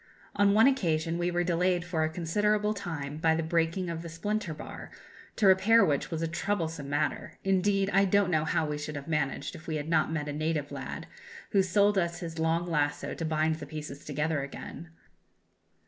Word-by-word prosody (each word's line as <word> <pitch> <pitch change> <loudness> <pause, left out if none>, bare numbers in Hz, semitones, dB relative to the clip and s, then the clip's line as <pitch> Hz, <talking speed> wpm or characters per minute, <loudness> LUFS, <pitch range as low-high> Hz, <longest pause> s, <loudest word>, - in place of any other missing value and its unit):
On 205 0 +4
one 220 +2 +7
occasion 170 - +1
we 175 0 +1
were 175 0 0
delayed 175 0 +1
for 165 -2 0
a 155 - +1
considerable 210 +6 +1
time 160 -8 -5
by 160 0 +3
the 165 - -1
breaking 165 +3 0
of 165 -1 -4
the 170 - -7
splinter 205 +3 -2
bar, 150 - -8 0.5
to 215 - +1
repair 200 +4 +6
which 145 -3 0
was 165 -1 -3
a - - +1
troublesome 165 -4 -2
matter; 145 +2 -2
indeed, 195 +1 +2
I 195 +1 +5
don't 195 -1 +3
know 155 -2 +2
how 155 0 +1
we 150 -1 -3
should 150 0 -5
have 140 -1 -6
managed 150 -4 -1
if 155 - -11
we 160 - -2
had 150 0 -3
not 160 -1 +2
met 155 -2 -2
a 145 - -3
native 155 -1 -2
lad, - - -6 0.5
who 200 - +5
sold 200 +2 +3
us 170 -1 -1
his 165 -1 -6
long 165 +1 +1
lasso 150 -3 -1
to 165 - -4
bind 155 0 +1
the - - -8
pieces 150 -2 -7
together 150 +1 -1
again. 140 +4 -8
165 Hz, 200 wpm, -29 LUFS, 155-190 Hz, 0.5 s, one